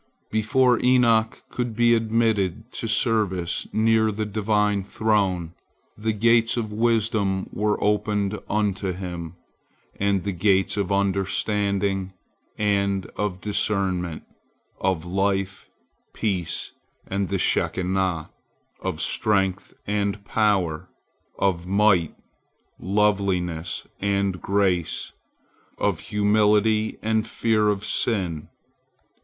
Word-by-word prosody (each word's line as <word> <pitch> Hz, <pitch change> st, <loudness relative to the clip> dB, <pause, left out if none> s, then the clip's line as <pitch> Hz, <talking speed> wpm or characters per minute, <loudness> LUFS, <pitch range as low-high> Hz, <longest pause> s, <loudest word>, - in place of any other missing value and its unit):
Before 120 Hz, +3 st, +2 dB
Enoch 115 Hz, -3 st, +3 dB
could 120 Hz, -3 st, -3 dB
be 120 Hz, +1 st, +4 dB
admitted 110 Hz, -2 st, 0 dB
to 115 Hz, -, -4 dB
service 105 Hz, -6 st, 0 dB
near 110 Hz, 0 st, +3 dB
the 105 Hz, +1 st, -3 dB
Divine 105 Hz, -1 st, +1 dB
throne, 95 Hz, -5 st, 0 dB, 0.4 s
the 110 Hz, +1 st, -1 dB
gates 115 Hz, +2 st, +3 dB
of 110 Hz, -3 st, -2 dB
wisdom 110 Hz, -4 st, +1 dB
were 105 Hz, 0 st, 0 dB
opened 105 Hz, 0 st, 0 dB
unto 100 Hz, -3 st, 0 dB
him, 90 Hz, -2 st, -6 dB, 0.6 s
and 100 Hz, -2 st, +1 dB
the 100 Hz, -, -1 dB
gates 95 Hz, +1 st, +2 dB
of 100 Hz, -2 st, -1 dB
understanding, 100 Hz, 0 st, 0 dB, 0.4 s
and 100 Hz, -2 st, +1 dB
of 95 Hz, -3 st, -3 dB
discernment, 95 Hz, -4 st, -1 dB, 0.6 s
of 90 Hz, -3 st, 0 dB
life, 95 Hz, +1 st, -1 dB, 0.5 s
peace, 95 Hz, -6 st, -2 dB, 0.3 s
and 100 Hz, 0 st, -2 dB
the 100 Hz, -, 0 dB
Shekinah, 95 Hz, -3 st, 0 dB, 0.5 s
of -, -, -4 dB
strength 95 Hz, -3 st, 0 dB
and 100 Hz, 0 st, -1 dB
power, 95 Hz, -8 st, 0 dB, 0.5 s
of 90 Hz, -3 st, 0 dB
might, 95 Hz, -4 st, +3 dB, 0.6 s
loveliness, 95 Hz, -4 st, 0 dB
and 100 Hz, -2 st, 0 dB
grace, 95 Hz, -4 st, 0 dB, 0.7 s
of -, -, 0 dB
humility 105 Hz, +1 st, +2 dB
and 110 Hz, 0 st, +1 dB
fear 110 Hz, -2 st, +1 dB
of 105 Hz, 0 st, -1 dB
sin. 90 Hz, -9 st, -1 dB
100 Hz, 100 wpm, -24 LUFS, 95-110 Hz, 0.7 s, be